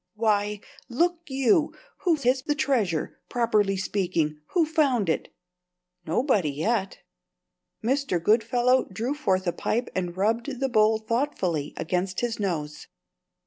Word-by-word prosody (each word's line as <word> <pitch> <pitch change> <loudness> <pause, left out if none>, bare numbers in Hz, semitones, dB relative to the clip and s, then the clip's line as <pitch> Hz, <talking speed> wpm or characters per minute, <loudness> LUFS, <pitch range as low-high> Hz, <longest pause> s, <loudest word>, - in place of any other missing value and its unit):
Why, 210 -1 +1 0.3
look 340 +8 +1
you, 270 +2 +2 0.2
whose 320 -8 0
is 255 +1 +3
the 295 +3 -1
treasure, 235 - 0
properly 215 -5 +1
speaking? 175 -6 -1
Who 340 -3 +4
found 275 - +1
it?" - - -1 0.8
"Nobody, 195 - +2
yet." 190 +8 -1 0.8
Mr. 260 -6 0
Goodfellow 240 +6 +3
drew 225 +8 -3
forth 190 -10 0
a 175 - 0
pipe 235 +7 -1
and 180 -1 -3
rubbed 235 +6 0
the 270 0 0
bowl 220 -1 +4
thoughtfully 220 - -2
against 180 +3 -1
his 240 -2 -2
nose. 155 -7 -3
220 Hz, 125 wpm, -26 LUFS, 185-260 Hz, 0.8 s, Who